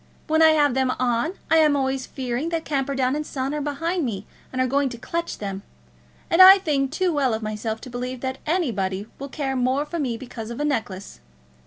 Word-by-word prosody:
When 315 +1 +2
I 320 -1 +7
have 290 -4 +3
them 260 0 +1
on 250 +6 0 0.2
I 325 - +6
am 305 -2 +5
always 265 -1 -1
fearing 255 +3 -3
that 330 -1 -2
Camperdown 270 -2 0
and 300 - -2
Son 270 -1 -3
are 300 - -2
behind 330 +5 -2
me 210 -6 -3 0.3
and 255 - -4
are 255 - +3
going 275 +2 +1
to 240 - -8
clutch 335 +7 -4
them. 195 -1 -5 0.7
And 335 - +4
I 380 +1 +11
think 290 -8 0
too 360 +2 0
well 265 -6 +1
of 220 - -6
myself 215 +1 -3
to - - -9
believe 250 +1 -5
that 260 0 -3
anybody 205 - -1
will 280 +1 -6
care 270 -2 -3
more 260 +3 +1
for 340 +3 -5
me 250 -6 -1
because 230 -3 -8
of 235 - -6
a 295 - 0
necklace. 220 - -3
270 Hz, 215 wpm, -23 LUFS, 240-300 Hz, 0.7 s, I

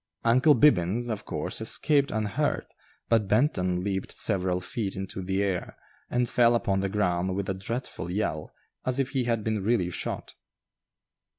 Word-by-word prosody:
"Uncle 130 +6 +5
Bibbins," 120 - +3
of 105 - -4
course, - - -3
escaped 145 -2 +3
unhurt, 110 +7 -1 0.3
but 115 -3 +2
Benton 95 - +1
leaped 95 -1 -2
several 95 -3 +1
feet 100 +2 -4
into 95 0 -5
the 95 +2 0
air, 95 -3 -3 0.3
and 125 0 +1
fell 120 -1 +4
upon 100 -4 +1
the 95 0 -1
ground 95 -2 0
with 100 -1 -2
a 95 - 0
dreadful 95 -3 -4
yell, 90 -5 -2 0.3
as 130 0 0
if 135 -1 0
he 130 -3 0
had 115 -2 0
been 110 -2 -1
really 100 -5 +1
shot. - - -4
105 Hz, 160 wpm, -27 LUFS, 95-120 Hz, 0.3 s, Uncle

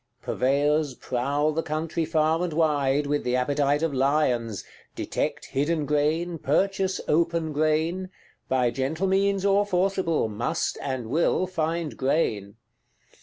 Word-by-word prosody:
Purveyors 145 +2 +1
prowl 140 +6 -1
the 160 +2 -1
country 160 +1 -2
far 160 +1 +1
and 175 -3 -2
wide, 145 -3 +2
with 145 +1 -1
the 125 0 0
appetite 145 +3 +1
of 165 -3 0
lions; 130 -6 +1 0.3
detect - - -3
hidden 150 +3 -1
grain, 155 +4 0
purchase 190 +6 0
open 165 0 +1
grain; 160 +5 0 0.4
by 125 -2 +2
gentle 145 +9 -2
means 195 0 +1
or 200 +1 +4
forcible, 185 - 0
must 110 +3 -2
and 130 -3 -3
will 160 +8 +1
find 165 -3 -2
grain. 115 -8 0
155 Hz, 125 wpm, -25 LUFS, 135-170 Hz, 0.4 s, or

